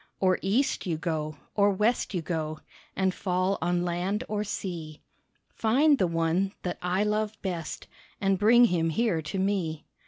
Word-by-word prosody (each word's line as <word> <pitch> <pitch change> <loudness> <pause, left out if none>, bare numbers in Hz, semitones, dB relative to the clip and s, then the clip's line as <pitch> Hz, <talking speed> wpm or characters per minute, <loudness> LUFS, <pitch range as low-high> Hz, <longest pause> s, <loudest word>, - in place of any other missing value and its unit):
Or 185 -1 +3
East 230 +4 0
you 165 -3 0
go, 155 -2 -3 0.2
or 205 -1 +4
West 210 +2 +1
you 175 - -1
go 155 -2 -3 0.3
And 190 -1 +1
fall 185 +1 0
on 175 +1 +1
land 180 +6 -1
or 210 0 -1
sea, 170 -7 -5 0.5
Find 275 +6 +3
the 185 - +3
one 165 +4 0
that 180 -1 -3
I 180 +3 +1
love 215 0 -1
best 175 -4 -4 0.3
And 195 -1 +1
bring 235 +4 +7
him 170 -6 +1
here 180 -2 +1
to 155 +5 -5
me. 190 -5 -1
185 Hz, 160 wpm, -28 LUFS, 165-210 Hz, 0.5 s, bring